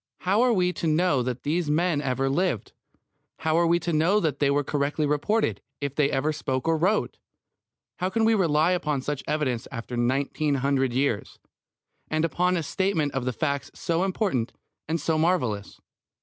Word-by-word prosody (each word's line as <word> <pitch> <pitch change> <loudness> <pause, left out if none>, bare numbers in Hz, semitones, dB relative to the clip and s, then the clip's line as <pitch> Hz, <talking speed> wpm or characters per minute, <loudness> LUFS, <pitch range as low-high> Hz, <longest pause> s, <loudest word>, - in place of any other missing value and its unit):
How 195 +5 +2
are 250 0 +4
we 180 -4 +2
to 170 - -3
know 155 -3 +2
that 125 0 -3
these 160 +1 0
men 160 0 +1
ever 135 -1 0
lived? 140 - 0 0.7
How 160 -1 0
are 170 0 +3
we 170 +1 +4
to 170 +1 -2
know 170 +7 +3
that 155 -7 -1
they 145 - +3
were 145 +1 +2
correctly 145 +2 -1
reported, 150 +10 0 0.2
if 140 -2 -3
they 145 -1 +2
ever 150 +4 0
spoke 130 -2 -3
or 165 - +3
wrote? 190 +7 0 0.8
How 185 - -1
can 225 +3 +1
we 225 - +4
rely 165 -4 +3
upon 150 -7 -1
such 145 -1 -3
evidence 130 -7 -1
after 120 0 -6
nineteen 140 +4 0
hundred 135 -1 +1
years, 125 -4 -1 0.7
and 155 +1 +1
upon 180 +3 +1
a 165 - -2
statement 165 -3 0
of 130 -1 -1
facts 140 0 -2
so 170 +1 0
important 185 - -1 0.3
and 165 +2 -1
so 155 +1 0
marvellous? 125 - 0
155 Hz, 180 wpm, -26 LUFS, 135-175 Hz, 0.8 s, are